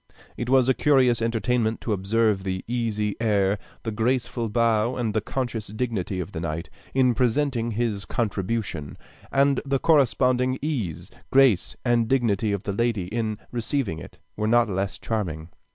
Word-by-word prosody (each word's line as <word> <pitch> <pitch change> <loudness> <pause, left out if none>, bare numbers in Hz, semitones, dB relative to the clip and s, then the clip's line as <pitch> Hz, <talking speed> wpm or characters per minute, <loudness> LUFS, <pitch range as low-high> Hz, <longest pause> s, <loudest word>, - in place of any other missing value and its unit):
It 120 - -4
was 130 -1 +4
a 130 - +5
curious 130 -6 +3
entertainment 115 0 0
to 110 - -1
observe 105 +1 +1
the 95 -1 -4
easy 110 -4 -1
air, 100 -3 +2 0.2
the 115 - -2
graceful 120 +1 -1
bow, 115 +1 +2
and 115 -4 -1
the 110 - +1
conscious 120 -2 -3
dignity 105 -4 -3
of 95 +2 -4
the 80 - -5
knight, 85 0 -4 0.2
in 130 -2 +4
presenting 120 -1 +1
his 105 -3 -1
contribution; 100 -7 -2 0.3
and 140 -1 +3
the 135 -1 0
corresponding 130 -3 +3
ease, 120 - -3 0.2
grace, 130 -9 +4
and 120 -2 +3
dignity 110 -5 +1
of 100 -1 -2
the 100 - -2
lady, 105 -4 0
in 110 -1 -2
receiving 120 - -2
it, - - -11 0.2
were 105 0 -1
not 120 0 +4
less 95 -1 -2
charming. 85 -8 -3
115 Hz, 155 wpm, -25 LUFS, 100-125 Hz, 0.3 s, a